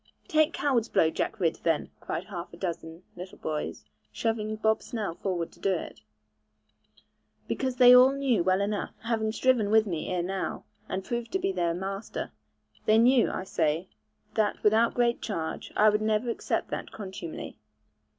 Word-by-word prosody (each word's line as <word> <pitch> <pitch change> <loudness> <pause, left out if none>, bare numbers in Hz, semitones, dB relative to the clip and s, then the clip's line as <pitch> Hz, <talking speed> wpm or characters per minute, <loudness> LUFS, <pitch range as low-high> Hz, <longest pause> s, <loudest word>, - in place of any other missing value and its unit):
'Take 310 +1 +3
coward's 255 -8 0
blow, 160 - +3
Jack - - -2
Ridd, 165 -4 +1
then,' 165 -3 0
cried 170 - -4
half 180 -3 -7
a 170 - -12
dozen 170 -1 -5
little 180 +1 -9
boys, 155 -1 -4 0.3
shoving 215 -1 -1
Bob 220 0 +1
Snell 215 -8 -4
forward 175 -2 -3
to - - -20
do 195 - +1
it; - - -6 1.5
because 260 -2 -1
they 250 0 +8
all 255 +1 +8
knew 270 -9 +1
well 185 +2 +2
enough, 205 0 -2
having 225 -1 0
striven 235 -3 +2
with 220 +1 +5
me 170 -6 -3
ere 180 -1 0
now, 190 +1 -3 0.3
and 190 0 -3
proved 235 -1 -3
me - - -32
to 380 - +1
be 195 - 0
their 170 -2 0
master 195 +3 -5 0.6
they 215 - +6
knew, 245 +2 +5
I - - -3
say, 165 -1 -1 0.4
that 215 -2 0
without 220 +2 +4
great 240 -1 +2
change, 165 -7 -4
I 215 +1 +6
would 210 0 +1
never 215 +2 +1
accept - - -2
that - - -4
contumely. 190 -5 -7
210 Hz, 170 wpm, -28 LUFS, 180-230 Hz, 1.5 s, they